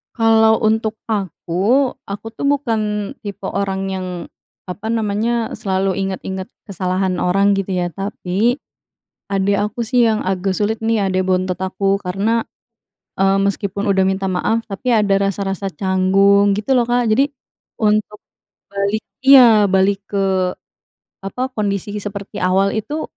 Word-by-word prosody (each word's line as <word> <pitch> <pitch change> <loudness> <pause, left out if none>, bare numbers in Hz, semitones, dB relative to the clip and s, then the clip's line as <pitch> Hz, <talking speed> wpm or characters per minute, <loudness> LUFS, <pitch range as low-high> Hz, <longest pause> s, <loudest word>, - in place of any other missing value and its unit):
Kalau 225 -1 +4
untuk 220 0 +1 0.2
aku, 205 - 0 0.2
aku 200 +2 -7
tuh, 230 +5 -4
bukan 220 -7 0
tipe 205 -2 -8
orang 195 -1 -2
yang, 190 -1 -3 0.6
apa 200 +4 -8
namanya, 225 +1 0
selalu 190 -3 -1
ingat-ingat 190 0 -5 0.2
kesalahan 185 -1 -2
orang, 195 +3 +2
gitu 195 -1 -2
ya. 175 - -2
Tapi, 200 +4 -1 0.7
adik 195 0 +1
aku 210 +3 -2
sih, 240 +1 +2
yang 220 -1 +1
agak 190 0 -1
sulit 215 +3 -1
nih, 225 -1 0
adik 185 0 0
bontot 185 -1 0
aku. 195 +1 0
Karena, 205 +5 -1 0.7
eee, 195 0 +2
meskipun 200 0 -2
udah 190 - +2
minta 195 0 -2
maaf, 220 +5 0
tapi 215 +5 -4
ada 205 -4 +3
rasa-rasa 195 0 -3
canggung, 195 +2 +3
gitu 215 +6 0
lo, 250 - +4
Kak. 245 0 +2
Jadi, 275 +5 +3 0.5
untuk 210 -1 +1 0.5
balik 200 +2 -1 0.2
iya, 240 -6 +8
balik 195 +1 +1
ke, 195 -1 0 0.8
apa, 250 +7 -4
kondisi 205 -3 -2
seperti 200 0 -6
awal 190 +2 +2
itu, 290 +9 -3
200 Hz, 135 wpm, -18 LUFS, 190-220 Hz, 0.8 s, iya